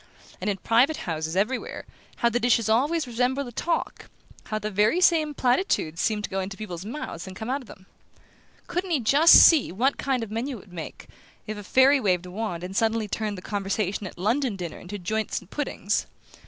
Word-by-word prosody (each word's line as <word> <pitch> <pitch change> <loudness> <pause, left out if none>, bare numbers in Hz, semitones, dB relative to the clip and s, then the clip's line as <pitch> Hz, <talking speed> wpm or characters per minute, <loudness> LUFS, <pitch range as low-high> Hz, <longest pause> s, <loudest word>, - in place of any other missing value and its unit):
And - - -1
in 200 - -1
private 245 - +3
houses, 160 -1 -3
everywhere, 215 +7 -2 0.3
how 235 - +2
the 240 +1 0
dishes 240 -2 +2
always 285 +8 +2
resembled 250 +3 -1
the 245 - -8
talk 335 +8 -3 0.4
how 215 - -3
the 215 0 -4
very 210 - +2
same 315 -5 +3
platitudes 245 - +1
seemed 215 -2 0
to - - -3
go 195 - -1
into 195 +1 -5
people's 185 -5 -6
mouths 210 - -6
and 185 - -9
come 220 +6 -4
out 275 +2 -1
of 250 - -15
them? 190 - -14 0.8
Couldn't 360 +2 -3
he 330 - +2 0.3
see 325 -3 +9
just - - -8
what 265 +5 +1
kind 260 -4 0
of 215 - -8
menu 240 +4 -3
it - - -12
would 190 - -19
make, 165 -3 -8 0.4
if 215 - -5
a 205 - -8
fairy 265 +6 +5
waved 185 -6 +1
a 180 - -9
wand 185 -4 -4
and 185 +1 -6
suddenly 225 0 +1
turned 210 -1 -3
the 180 - -9
conversation 200 -1 -2
at - - -11
a - - -9
London 235 +3 +1
dinner 175 -4 -6
into 195 +3 -7
joints 215 +4 -2
and 185 - -19
puddings? 250 -7 -2
220 Hz, 210 wpm, -25 LUFS, 195-260 Hz, 0.8 s, see